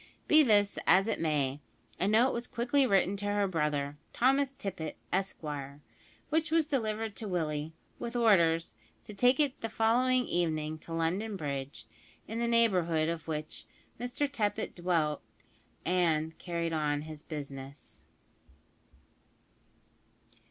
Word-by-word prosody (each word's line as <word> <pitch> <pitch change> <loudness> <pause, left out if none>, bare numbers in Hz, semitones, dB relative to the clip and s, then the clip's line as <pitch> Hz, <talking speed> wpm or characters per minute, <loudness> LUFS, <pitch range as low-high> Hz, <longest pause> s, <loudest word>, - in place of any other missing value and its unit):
Be 310 0 +7
this 205 -6 +3
as 190 +3 +5
it - - -1
may, 145 -4 0 0.4
a 190 - +1
note 225 +5 +4
was 235 +1 -3
quickly 255 +3 +2
written 195 -2 +3
to 205 +1 -3
her 205 -1 +1
brother, 150 -4 -1
Thomas 270 +2 +3
Tippet, 195 - -5 0.2
Esquire, 150 -7 -3 0.5
which 320 +1 +1
was 325 0 +3
delivered 220 -6 -2
to 220 - -5
Willie, 155 -4 -2 0.3
with 235 0 -5
orders 170 -8 +3 0.3
to 215 - -9
take 245 +6 +3
it 285 -3 +1
the 225 - -3
following 250 +3 +2
evening 155 -2 -1
to 165 - -11
London 180 +6 -1
Bridge, 140 -5 -5 0.4
in 225 +1 -4
the 235 - +1
neighbourhood 180 -9 +3
of 165 -1 -4
which 155 -1 -4 0.3
Mr 245 +4 -1
Tippet 215 -6 -2
dwelt 165 -4 0 0.6
and 160 -3 +1
carried 170 -2 -2
on 150 -2 0
his 155 -1 -8
business. 140 -2 -8
180 Hz, 130 wpm, -31 LUFS, 155-230 Hz, 0.6 s, Be